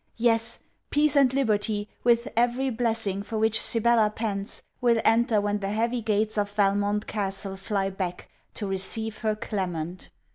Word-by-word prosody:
Yes, 225 -1 +2 0.3
peace 295 0 +2
and 275 -3 +5
liberty, 215 -5 0 0.2
with 235 +1 +3
every 245 +3 +1
blessing 225 -4 0
for 215 +2 -5
which 220 0 +3
Sibella 230 -1 +3
pants, 210 -2 -2 0.2
will 235 -2 +3
enter 230 -1 +4
when 205 0 0
the 195 -1 -3
'heavy 230 +3 0
gates 215 0 0
of 205 0 0
Valmont 205 0 +1
castle 195 -1 -2
fly 195 0 -2
back' 185 -2 -4 0.3
to 210 - -3
receive 205 +3 -3
her 215 -2 0
Clement. 180 -5 -4
215 Hz, 150 wpm, -26 LUFS, 200-230 Hz, 0.3 s, and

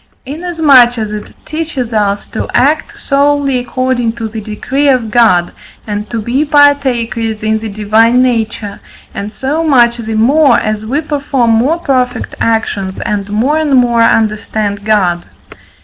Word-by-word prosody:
Inasmuch 285 -5 +3
as 215 -2 -3
it 210 0 -7
teaches 300 -7 -4
us 205 -1 0
to - - -4
act 295 +4 +1
solely 280 -2 +1
according 245 -1 -1
to 230 -1 -5
the 220 0 -7
decree 260 +7 -1
of 245 -5 +1
God, 185 -7 +3 0.3
and 210 0 -5
to 230 - -3
be 240 +7 0
partakers 255 -7 +1
in 220 0 0
the 220 0 -6
Divine 215 +4 +2
nature, 220 -4 -2 0.3
and 205 +1 -5
so 285 +7 -2
much 240 -6 +3
the 225 -2 -5
more, 265 +4 +4
as 215 -1 -3
we 280 +6 -1
perform 280 -5 -1
more 250 +9 +2
perfect 255 -6 -2
actions 205 -4 -1
and 205 -1 -3
more 250 +9 0
and 300 -3 +1
more 240 -2 +3
understand 215 -2 0
God. 185 -5 +1
235 Hz, 150 wpm, -12 LUFS, 215-275 Hz, 0.3 s, more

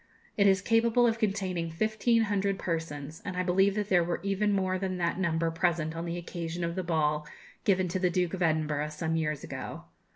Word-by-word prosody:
It 200 -1 +4
is 190 -1 +3
capable 230 +2 +3
of 225 -1 +1
containing 190 -6 -1
fifteen 220 +6 +1
hundred 200 -2 0
persons, 160 -4 -4
and 185 -2 -5
I 180 - +1
believe 195 +2 +3
that 210 -1 -2
there 180 -2 +4
were 170 0 -2
even 200 +1 +1
more 185 -2 +1
than 185 -1 -2
that 170 +1 -1
number 165 -2 +1
present 165 -1 0
on 165 +1 -4
the 170 0 -3
occasion 170 0 -5
of 170 0 -1
the 185 - -2
ball 150 -3 0 0.4
given 185 -2 +3
to 185 +2 -1
the 180 -1 +2
Duke 180 0 0
of 190 - -4
Edinburgh 155 -2 +1
some 160 +1 -2
years 155 -2 -1
ago. - - -6
180 Hz, 205 wpm, -29 LUFS, 165-195 Hz, 0.4 s, It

